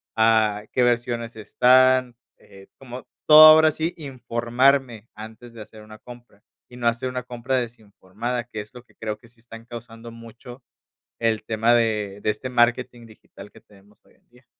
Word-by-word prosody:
a 110 -2 +2
qué 125 - 0
versiones 120 -1 -2
están, 130 +3 +2 0.2
eh, 95 0 -18
como 125 -1 -11 0.2
todo 155 0 +9
ahora 155 0 +6
sí, 160 +3 -4
informarme 125 -3 -1
antes 110 +3 -12
de 115 - -11
hacer 110 +1 -16
una 110 0 -14
compra 120 -3 -16 0.3
y 125 - -14
no 120 - -7
hacer 120 +2 -1
una 125 -1 -6
compra 125 +1 -5
desinformada, 115 0 -6
que 110 -3 -8
es 105 - -15
lo 125 - -12
que - - -30
creo 110 -1 -6
que 120 - -21
sí 115 0 -25
están 115 0 -14
causando 115 -1 -11
mucho 115 +2 -14 0.5
el 115 -2 -1
tema 115 +1 +1
de 105 -4 -1
de - - -2
este 110 +5 -4
marketing 120 0 0
digital 105 -2 -16
que - - -18
tenemos 100 0 -24
hoy - - -27
en - - -38
día. 125 +1 -25
120 Hz, 175 wpm, -22 LUFS, 110-125 Hz, 0.5 s, todo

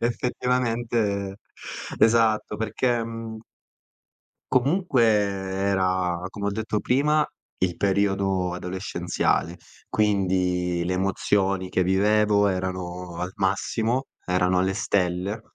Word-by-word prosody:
effettivamente 115 -4 -1 0.6
Esatto 110 -1 +3
perché, 115 +2 0
mhmm 115 -1 -6 1.1
comunque 140 +1 +2
era, 95 -3 +1
come 100 0 -4
ho - - +1
detto 110 +1 -2
prima, 150 +4 +2 0.3
il 90 -2 0
periodo 95 -2 +1
adolescenziale, 90 -1 -1 0.3
quindi 90 -4 +1
le 90 - -1
emozioni 95 0 0
che 95 - +1
vivevo 105 +2 +3
erano 90 -2 -3
al 90 +2 -4
massimo, 110 +6 0 0.2
erano 90 0 +2
alle 95 +1 +1
stelle. 95 +1 0
100 Hz, 95 wpm, -25 LUFS, 90-110 Hz, 1.1 s, Esatto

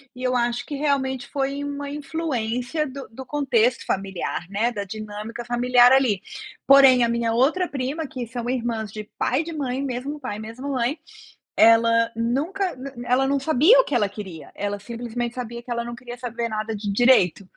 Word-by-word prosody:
e 250 - -10
eu 255 0 +1
acho 240 0 0
que 290 - -5
realmente 270 -3 -1
foi 280 0 -2
uma 285 0 -4
influência 285 -2 -2
do 270 0 -8
do 260 +4 -9
contexto 255 -4 +1
familiar, 195 -2 -3
né, 220 +5 0
da 205 -3 -4
dinâmica 215 +3 -7
familiar 245 +1 +4
ali, 255 -8 +3 0.5
porém 270 -3 +7
a 235 - +2
minha 235 -1 0
outra 305 +10 +2
prima 280 +4 -3
que 250 -3 -6
são 240 0 -5
irmãs 230 -4 -2
de 215 0 -6
pai 260 +4 +1
de 335 - -7
mãe 270 -3 -2
mesmo 275 +3 -4
pai 250 -7 -5
mesmo 230 +6 -7
mãe 255 +4 -1 0.7
ela 230 0 +3 0.4
nunca 370 +8 -1 0.2
na 275 - -5
na 240 0 -7
ela 270 +1 +3
não 280 - +2
sabia 315 - +6
o - - +2
que - - -3
ela 205 -3 +1
queria, 185 -7 -8 0.2
ela 205 0 -2
simplesmente 240 0 -4
sabia 235 0 -6
que 245 - -12
ela 235 - -2
não 240 - -5
queria 245 -1 -8
saber 235 0 -3
nada 215 0 -3
de 210 - -6
direito, 240 -8 +5
245 Hz, 190 wpm, -23 LUFS, 230-275 Hz, 0.7 s, porém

